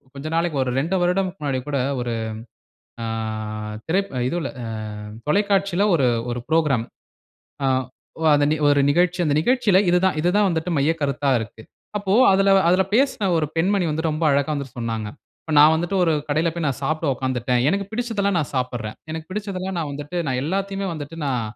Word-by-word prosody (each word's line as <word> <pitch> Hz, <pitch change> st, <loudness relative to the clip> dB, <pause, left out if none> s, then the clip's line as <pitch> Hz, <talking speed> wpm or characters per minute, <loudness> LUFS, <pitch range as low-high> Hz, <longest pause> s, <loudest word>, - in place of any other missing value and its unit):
கொஞ்ச 140 Hz, +3 st, -6 dB
நாளைக்கு 165 Hz, -3 st, 0 dB
ஒரு 125 Hz, -, -2 dB
ரெண்டு 165 Hz, +7 st, -1 dB
வருடத்துக்கு 180 Hz, +1 st, 0 dB
முன்னாடி 140 Hz, -3 st, -1 dB
கூட 145 Hz, -1 st, -1 dB, 0.2 s
ஒரு, 120 Hz, -1 st, -2 dB, 0.9 s
ஆ -, -, -2 dB, 0.8 s
திரைப் 195 Hz, +4 st, 0 dB, 0.2 s
இதுல, 170 Hz, -3 st, -2 dB
அ -, -, -5 dB, 0.6 s
தொலைக்காட்சில 200 Hz, +1 st, +2 dB
ஒரு, 140 Hz, -7 st, +3 dB, 0.2 s
ஒரு 120 Hz, -, -3 dB
புரோகிராம். 150 Hz, -8 st, +2 dB, 0.8 s
அ -, -, +3 dB, 0.6 s
ஒ -, -, -1 dB
அந்த 145 Hz, 0 st, +3 dB, 0.2 s
ஒரு 145 Hz, 0 st, +4 dB
நிகழ்ச்சி, 180 Hz, +3 st, +2 dB
அந்த 150 Hz, -3 st, +1 dB
நிகழ்ச்சில 215 Hz, -1 st, +3 dB
இது 180 Hz, -, +4 dB
தான், 185 Hz, -, +1 dB
இது 175 Hz, +3 st, +2 dB
தான் 210 Hz, -1 st, +4 dB
வந்துட்டு 165 Hz, 0 st, -1 dB
மையக்கருத்தா 145 Hz, -2 st, 0 dB
இருக்கு. 110 Hz, 0 st, -8 dB, 0.4 s
அப்போ 195 Hz, -1 st, 0 dB, 0.2 s
அதுல, 195 Hz, +1 st, +3 dB, 0.2 s
அதுல 185 Hz, +2 st, +4 dB
பேசின 255 Hz, -5 st, +2 dB
ஒரு 155 Hz, -, 0 dB
பெண்மணி 190 Hz, +3 st, +2 dB
வந்து 160 Hz, +2 st, -1 dB
ரொம்ப 155 Hz, +2 st, -4 dB
அழகா 140 Hz, +1 st, +1 dB
வந்து 140 Hz, -2 st, -4 dB
சொன்னாங்க. 115 Hz, -3 st, -3 dB, 0.3 s
இப்ப 160 Hz, -, -5 dB
நான் 150 Hz, +2 st, +8 dB
வந்துட்டு, 175 Hz, +4 st, -1 dB
ஒரு 165 Hz, -, +2 dB, 0.2 s
கடையில 155 Hz, +3 st, +1 dB
போய் 170 Hz, -3 st, -2 dB
நான் 135 Hz, -, -3 dB
சாப்ட 155 Hz, +3 st, -1 dB
உட்காந்துட்டேன். 125 Hz, -1 st, -1 dB
எனக்கு 200 Hz, +1 st, -1 dB
பிடிச்சதெல்லாம் 215 Hz, -5 st, 0 dB
நான் 150 Hz, -5 st, -3 dB
சாப்பட்றேன். 120 Hz, -4 st, -3 dB
எனக்கு 160 Hz, 0 st, -6 dB
பிடிச்சதெல்லாம் 190 Hz, -2 st, -4 dB
நான் 155 Hz, -3 st, -2 dB
வந்துட்டு, 145 Hz, +5 st, -5 dB
நான் 130 Hz, -2 st, 0 dB
எல்லாத்தையுமே 195 Hz, +4 st, -2 dB
வந்துட்டு, 150 Hz, +1 st, -7 dB
நான் 130 Hz, -4 st, 0 dB
160 Hz, 175 wpm, -22 LUFS, 140-190 Hz, 0.9 s, நான்